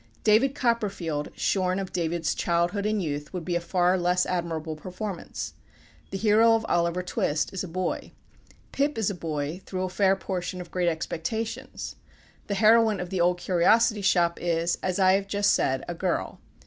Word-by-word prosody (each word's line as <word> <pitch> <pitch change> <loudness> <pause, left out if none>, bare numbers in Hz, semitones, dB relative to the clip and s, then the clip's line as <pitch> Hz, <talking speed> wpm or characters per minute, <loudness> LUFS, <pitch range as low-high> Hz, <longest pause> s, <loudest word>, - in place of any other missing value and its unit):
"David 230 +6 +4
Copperfield" 200 - -1
shorn 185 -1 +1
of 195 -1 -4
David's 170 -2 0
childhood 175 +4 0
and 215 -2 0
youth 150 -1 -4
would 180 -3 -4
be 175 - -1
a 170 - 0
far 180 +1 +2
less 180 +1 +2
admirable 165 -3 -2
performance. 185 +4 -6 0.6
The 195 - -4
hero 220 +2 +5
of 225 0 -1
"Oliver 170 +1 +1
Twist" 155 -3 -1
is 190 - -3
a - - -5
boy. 180 +1 -3 0.6
Pip 285 0 0
is 215 -2 +1
a - - -4
boy 155 0 -4
through 185 -1 -3
a 185 - -2
fair 190 +1 +3
portion 185 -1 -4
of 180 - -9
"Great 180 -1 +1
Expectations." 170 +7 -4 0.5
The 200 - -1
heroine 220 0 +5
of 180 0 -5
"The 185 -2 0
Old 175 +1 +3
Curiosity 205 +5 +3
Shop" 175 -3 +2
is, 170 0 0
as 185 -1 -1
I 190 -1 +5
have 195 0 +1
just 200 0 +2
said, 130 0 0
a 175 - -3
girl. 175 +1 -2
180 Hz, 175 wpm, -26 LUFS, 170-200 Hz, 0.6 s, hero